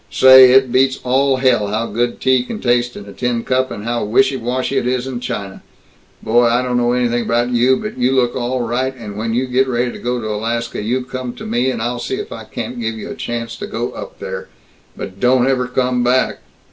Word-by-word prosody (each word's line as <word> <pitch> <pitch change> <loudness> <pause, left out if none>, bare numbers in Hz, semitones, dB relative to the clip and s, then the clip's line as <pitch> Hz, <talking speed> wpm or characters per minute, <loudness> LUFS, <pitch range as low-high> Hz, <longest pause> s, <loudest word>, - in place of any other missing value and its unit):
Say, 130 -1 +8
it 130 -1 +4
beats 130 +1 +2
all 135 +2 +2
hell 125 -5 +2
how 110 +3 -1
good 120 +2 -2
tea 130 -1 +3
can 215 - -6
taste 120 0 +1
in 100 - -9
a 100 - -11
tin 120 -2 -2
cup, 130 0 0
and 115 -4 -7
how 120 +1 -1
wishy 125 +6 +2
washy 125 +1 -1
it - - -3
is 125 0 -1
in 130 -2 -4
china. 100 -5 -5 0.6
Boy, 120 +2 +3
I 120 +2 +2
don't 125 -1 -1
know 120 0 +2
anything 120 -1 +1
about 120 +1 0
you, 125 +2 +3
but 215 -10 -6
you 125 +2 +2
look 125 -2 +1
all 125 0 -1
right, 125 +3 -1
and 105 -5 -8
when 115 +2 -2
you 130 +2 +1
get 130 +1 +1
ready 120 -1 0
to - - -9
go 125 0 -2
to 110 - -5
Alaska, 115 +2 -3
you 125 +5 -1
come 125 -1 -5
to - - -9
me, 120 +4 0
and 120 -3 -3
I'll 120 +1 -2
see 130 - -3
if - - -6
I 110 -1 -8
can't 120 +2 -6
give 115 0 -2
you 110 - -7
a - - -6
chance 115 -1 -4
to - - -6
go - - -3
up - - -9
there. - - -6 0.5
But 95 +1 -7
don't 125 +1 +3
ever 130 -2 +1
come 125 0 0
back!" 125 +1 +1
125 Hz, 235 wpm, -18 LUFS, 115-130 Hz, 0.6 s, Say